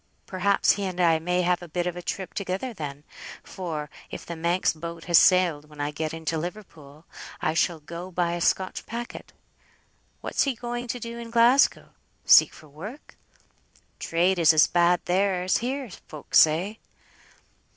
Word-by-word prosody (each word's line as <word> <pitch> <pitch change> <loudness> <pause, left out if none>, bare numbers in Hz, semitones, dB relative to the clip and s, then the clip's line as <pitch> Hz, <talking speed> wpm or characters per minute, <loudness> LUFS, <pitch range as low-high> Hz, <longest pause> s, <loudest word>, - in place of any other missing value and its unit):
Perhaps 200 +1 +2
he 200 - -2
and 185 -1 -5
I 165 -2 +4
may 180 +2 0
have 180 0 +1
a 175 - -9
bit 175 +2 -2
of 180 -1 -3
a 180 - -6
trip 190 +1 -5
together 200 +5 -4
then, 145 -6 -7 0.4
for, 160 -5 -5 0.2
if - - -8
the 170 - -6
Manx 170 +3 +1
boat 165 +1 -8
has 170 -2 +5
sailed 170 -5 +3
when 150 -1 -15
I 145 0 -2
get 155 +1 -4
into 160 0 -3
Liverpool, 160 -5 -9 0.3
I - - 0
shall 165 0 0
go 170 +4 -8
by 175 -1 -1
a 175 - -4
Scotch 185 +2 -1
packet. 235 +1 -7 0.9
What's - - -2
he 275 -3 +1
going 240 +1 -5
to 245 +1 -4
do 235 0 -7
in 235 -1 -8
Glasgow? 235 +4 +3 0.4
Seek - - +7
for 155 - -16
work? 195 - -11 0.8
Trade 175 +2 +1
is 165 -1 +6
as 155 -1 +6
bad 175 0 +2
there 185 0 +1
as 185 - +2
here, 260 -1 -4 0.2
folk 150 - -12
say." 175 +8 +4
175 Hz, 170 wpm, -25 LUFS, 160-200 Hz, 0.9 s, Seek